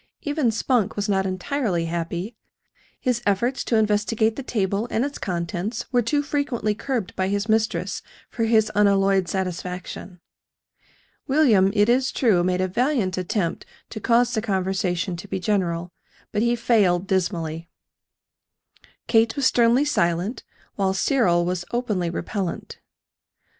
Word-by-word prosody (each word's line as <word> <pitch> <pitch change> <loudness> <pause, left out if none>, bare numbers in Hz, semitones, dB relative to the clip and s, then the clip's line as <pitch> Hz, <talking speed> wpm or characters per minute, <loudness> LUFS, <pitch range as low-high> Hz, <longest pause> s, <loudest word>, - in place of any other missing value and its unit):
Even 290 -4 +1
Spunk 225 -1 0
was 205 +1 -2
not 190 -1 +1
entirely 185 -1 -1
happy 170 +5 -4 0.6
his 250 -3 0
efforts 235 +6 0
to 235 - +1
investigate 220 +1 +2
the 275 - -5
table 205 -3 -1
and 230 +4 0
its 285 - -6
contents 180 +4 -3
were 245 - +4
too 290 +6 0
frequently 280 -7 -1
curbed 230 -3 -3
by 185 - 0
his 200 +2 -1
mistress 220 +1 0 0.3
for 230 - -2
his 220 -1 +3
unalloyed 195 -2 +3
satisfaction. 180 0 -5 1.1
William, 240 -10 +4
it 205 0 +4
is 255 +2 +2
true, 205 -9 +2
made 180 0 +1
a 185 - +1
valiant 235 -2 0
attempt 185 -1 -2 0.3
to 215 - -5
cause 240 +2 +2
the 220 - 0
conversation 190 -3 -1
to 175 +4 -9
be 190 - -3
general; 175 -3 -1 0.4
but 210 - 0
he 235 +1 +2
failed 200 -7 +2
dismally. 170 -4 -2 1.4
Kate 225 -1 +3
was 280 - 0
sternly 240 +3 +4
silent, 175 - 0 0.3
while 190 -1 +1
Cyril 190 -7 +2
was 180 0 -2
openly 210 -8 -1
repellent. 175 +2 -4
205 Hz, 135 wpm, -23 LUFS, 185-235 Hz, 1.4 s, were